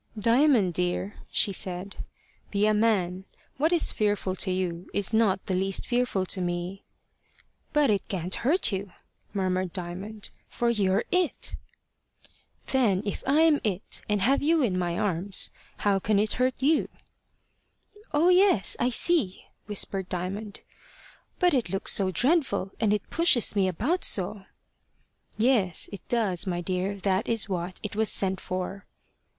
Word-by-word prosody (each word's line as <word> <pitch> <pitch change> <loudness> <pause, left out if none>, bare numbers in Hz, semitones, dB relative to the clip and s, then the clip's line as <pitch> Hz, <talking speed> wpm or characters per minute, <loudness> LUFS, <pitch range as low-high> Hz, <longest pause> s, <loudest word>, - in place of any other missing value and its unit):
"Diamond, 230 - +3
dear," 180 +4 -1 0.2
she 200 - +2
said, 185 +1 -4 0.5
"be 205 0 +1
a 215 - +3
man. 190 -4 +1 0.3
What 310 +5 +2
is 345 -2 +2
fearful 205 -3 -1
to 190 - +1
you 180 -2 -3
is 205 +2 +1
not 210 -4 +2
the 190 - -2
least 190 +1 0
fearful 240 -6 0
to 185 0 -1
me." 175 +2 -3 0.9
"But 295 -5 +3
it 200 -2 -1
can't 185 -1 -4
hurt 285 0 +2
you," 195 -1 -4 0.4
murmured 185 -2 -1
Diamond, 195 +4 -6 0.2
"for 235 0 0
you're 195 -4 +1
it." 360 -3 0 1.2
"Then 215 -8 +2
if 200 - -3
I'm 305 +1 +4
it, 200 -2 -3
and 205 -2 +1
have 270 +5 +3
you 315 0 +2
in 205 -7 0
my 175 -2 -1
arms, 190 -1 0 0.3
how 200 -1 +1
can 210 +2 +1
it 210 +1 +2
hurt 255 0 0
you?" 300 +4 +1 1.2
"Oh 315 +4 +3
yes! 365 - +4
I 245 - +2
see," 255 - +2 0.2
whispered 195 -2 -1
Diamond. 195 +4 -5 0.8
"But 360 -3 +3
it 245 -9 0
looks 195 +2 +1
so 195 -2 +3
dreadful, 245 - +1
and 215 -2 +2
it 210 -2 -1
pushes 330 -11 +3
me 195 -2 +2
about 245 - -1
so." 195 +1 +1 0.9
"Yes, 215 -6 +2
it 200 - -8
does, 205 -7 +1
my 175 -1 -1
dear. 185 +2 -2
That 195 +1 -1
is 225 -3 +2
what 180 -1 -4
it 210 - -5
was 220 0 +2
sent 190 -1 -1
for." 185 +2 -5
200 Hz, 150 wpm, -27 LUFS, 185-240 Hz, 1.2 s, I'm